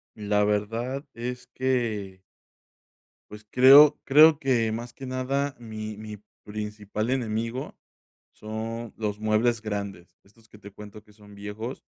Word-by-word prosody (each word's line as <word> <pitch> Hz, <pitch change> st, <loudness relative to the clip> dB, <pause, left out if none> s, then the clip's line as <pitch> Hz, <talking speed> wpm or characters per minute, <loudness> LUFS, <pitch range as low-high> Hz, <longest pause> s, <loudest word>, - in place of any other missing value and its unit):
La 105 Hz, -1 st, 0 dB
verdad 115 Hz, +6 st, -2 dB
es 125 Hz, +1 st, -6 dB
que 115 Hz, -8 st, -2 dB, 1.1 s
pues, 105 Hz, 0 st, -12 dB
creo 140 Hz, +5 st, +8 dB
creo 155 Hz, +2 st, +6 dB
que, 120 Hz, -6 st, +1 dB
más 120 Hz, +2 st, -6 dB
que 135 Hz, -, -9 dB
nada, 135 Hz, +2 st, -2 dB
mi 110 Hz, -2 st, -7 dB
mi 105 Hz, 0 st, -8 dB, 0.3 s
principal 105 Hz, +1 st, -4 dB
enemigo 115 Hz, 0 st, -3 dB, 0.5 s
son 110 Hz, +1 st, -6 dB
los 105 Hz, -2 st, -3 dB
muebles 110 Hz, +2 st, +1 dB
grandes. 100 Hz, -4 st, -5 dB
Estos 110 Hz, +3 st, -24 dB
que 105 Hz, -, -17 dB
te 100 Hz, -, -11 dB
cuento, 105 Hz, +1 st, -12 dB
que 105 Hz, -, -22 dB
son 105 Hz, -1 st, -17 dB
viejos, 105 Hz, +5 st, -7 dB
110 Hz, 130 wpm, -26 LUFS, 105-125 Hz, 1.1 s, creo